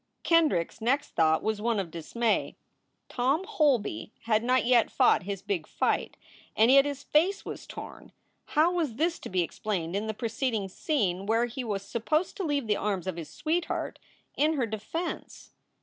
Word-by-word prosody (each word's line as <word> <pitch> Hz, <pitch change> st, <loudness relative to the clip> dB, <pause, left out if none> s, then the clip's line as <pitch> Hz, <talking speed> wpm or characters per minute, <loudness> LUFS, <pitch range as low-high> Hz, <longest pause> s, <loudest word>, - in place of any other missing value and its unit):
Kendrick 310 Hz, -, +3 dB
s -, -, -19 dB
next 275 Hz, +6 st, +1 dB
thought 160 Hz, -1 st, +2 dB
was 220 Hz, -1 st, -1 dB
one 230 Hz, -1 st, +1 dB
of 180 Hz, -4 st, -4 dB
dismay. 215 Hz, +8 st, -1 dB, 0.5 s
Tom 270 Hz, +8 st, +1 dB
Holby 295 Hz, -, +1 dB
had 220 Hz, -1 st, +1 dB
not 250 Hz, 0 st, +2 dB
yet 240 Hz, -2 st, +4 dB
fought -, -, +4 dB
his 195 Hz, -1 st, -4 dB
big 175 Hz, -6 st, -2 dB
fight, -, -, -1 dB, 0.4 s
and 225 Hz, +3 st, +6 dB
yet 275 Hz, +1 st, +7 dB
his 285 Hz, -1 st, -4 dB
face 350 Hz, +8 st, +2 dB
was -, -, -7 dB
torn. -, -, -9 dB, 0.5 s
How 320 Hz, +3 st, +5 dB
was 315 Hz, -10 st, -1 dB
this 330 Hz, +6 st, 0 dB
to -, -, -8 dB
be 185 Hz, -2 st, +1 dB
explained 175 Hz, -1 st, -3 dB
in 210 Hz, +2 st, -1 dB
the 220 Hz, -, -3 dB
preceding 225 Hz, -2 st, -2 dB
scene 195 Hz, -, -1 dB
where 225 Hz, +2 st, +3 dB
he 240 Hz, +2 st, -5 dB
was 205 Hz, -4 st, -3 dB
supposed 305 Hz, -, -1 dB
to 390 Hz, -, -2 dB
leave 290 Hz, -5 st, 0 dB
the 210 Hz, -2 st, +1 dB
arms 195 Hz, -4 st, -2 dB
of 185 Hz, -2 st, -3 dB
his 165 Hz, -3 st, -7 dB
sweetheart 335 Hz, +2 st, -2 dB, 0.4 s
in 305 Hz, +2 st, +3 dB
her 270 Hz, -6 st, 0 dB
defense 220 Hz, -, -5 dB
235 Hz, 180 wpm, -28 LUFS, 200-290 Hz, 0.5 s, yet